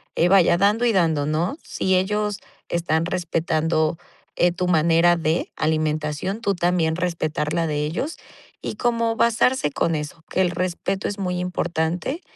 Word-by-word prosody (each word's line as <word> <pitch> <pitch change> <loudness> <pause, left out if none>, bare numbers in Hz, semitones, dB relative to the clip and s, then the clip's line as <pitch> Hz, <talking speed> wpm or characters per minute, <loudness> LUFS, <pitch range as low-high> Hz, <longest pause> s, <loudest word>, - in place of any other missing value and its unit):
eh, 170 - +3
vaya, 185 -3 +5
dando 210 +5 +3
y 235 - +3
dando, 160 -6 +2
¿no? 165 - -1
Si 190 0 0
ellos 210 +2 0 0.3
están 165 -1 0
respetando, 160 -2 0 0.4
eh, 175 - +4
tu 180 0 -2
manera 170 +1 +4
de 160 +1 -1
alimentación, 155 +4 -1
tú 200 -4 +1
también 175 -2 +1
respetar 155 -4 -2
la 170 -1 +1
de 150 -1 -1
ellos, 220 - -3 0.4
y - - -4
como 230 -2 0
basarse 235 - +2
con 165 +3 0
eso, 150 +2 -5
que 190 - 0
el 180 -2 +2
respeto 185 +2 -2
es 205 - -5
muy 180 -2 -2
importante, 180 - -2
175 Hz, 155 wpm, -23 LUFS, 160-190 Hz, 0.4 s, vaya